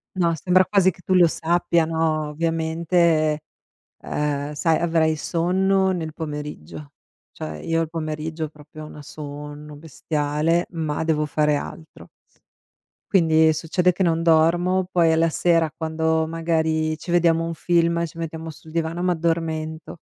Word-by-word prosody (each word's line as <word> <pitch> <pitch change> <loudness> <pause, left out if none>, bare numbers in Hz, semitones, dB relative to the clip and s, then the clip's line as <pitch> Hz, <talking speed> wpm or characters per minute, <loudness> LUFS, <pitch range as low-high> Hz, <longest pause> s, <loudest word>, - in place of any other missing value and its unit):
No, 170 -2 +2
sembra 185 +3 +3
quasi 190 -1 +3
che 180 - -8
tu 185 - +1
lo 175 -2 +6
sappia, 170 0 +1
no, 160 -2 0
ovviamente, 160 0 +1 0.6
uhm, 145 0 -2
sai, 160 +2 +1
avrai 160 -2 +1
sonno 190 +4 +1
nel 160 -4 -4
pomeriggio. 150 - -7 0.4
Cioè 75 0 -7
io 165 0 0
al 160 - -3
pomeriggio 160 0 -4
proprio 150 0 -13
ho 155 - -8
una 150 - -11
sonno 145 +1 -9
bestiale, 150 +2 -1
ma 160 -2 -2
devo 155 -2 +1
fare 150 0 +1
altro. 160 +2 -8 1.0
Quindi 160 -4 +4
succede 170 +3 +1
che 190 - -1
non 165 -2 +1
dormo, 170 +3 +3
poi 165 -3 +3
alla 165 0 +3
sera 165 -1 +2
quando 160 0 0
magari 160 -1 0
ci 170 - -11
vediamo 165 -1 +3
un 165 - -3
film, 170 0 +1
ci 165 - -12
mettiamo 165 0 -5
sul 160 +1 -12
divano, 165 +1 -2
m'addormento. 165 -2 -2
160 Hz, 140 wpm, -22 LUFS, 155-170 Hz, 1.0 s, lo